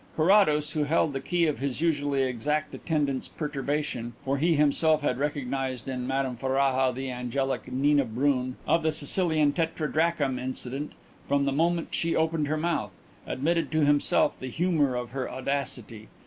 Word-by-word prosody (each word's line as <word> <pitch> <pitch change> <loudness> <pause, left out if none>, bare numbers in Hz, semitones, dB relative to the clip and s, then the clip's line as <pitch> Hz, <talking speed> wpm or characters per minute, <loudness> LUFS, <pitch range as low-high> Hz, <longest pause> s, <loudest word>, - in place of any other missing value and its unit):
Carrados, 155 -4 +4
who 150 -1 0
held 155 0 +1
the 135 - -2
key 170 +4 +1
of 150 -3 -1
his 135 -1 -2
usually 145 -4 +1
exact 130 +4 -1
attendant's 145 -5 -1
perturbation 145 -5 -3
for 135 +1 0
he 165 +2 +3
himself 150 +1 +3
had 125 -3 0
recognized 135 -3 -2
in 125 -2 -3
Madame 135 -1 -1
Ferraja 130 0 +1
the 130 +1 -4
angelic 125 +2 -2
Nina 140 +2 +3
Brun, 130 +2 0
of 165 - +3
the 160 0 +1
Sicilian 155 -1 +1
tetradrachm 160 -3 0
incident, 130 +2 -5 0.3
from 140 0 +2
the 140 - +1
moment 165 +4 +1
she 165 0 +1
opened 160 -2 +1
her 155 +2 0
mouth 155 - -1 0.3
admitted 165 +3 0
to 155 -2 +3
himself 145 0 +2
the 130 - -5
humour 150 -2 +1
of 125 -1 -4
her 130 0 -3
audacity. 130 -5 -4
145 Hz, 160 wpm, -27 LUFS, 130-155 Hz, 0.3 s, Carrados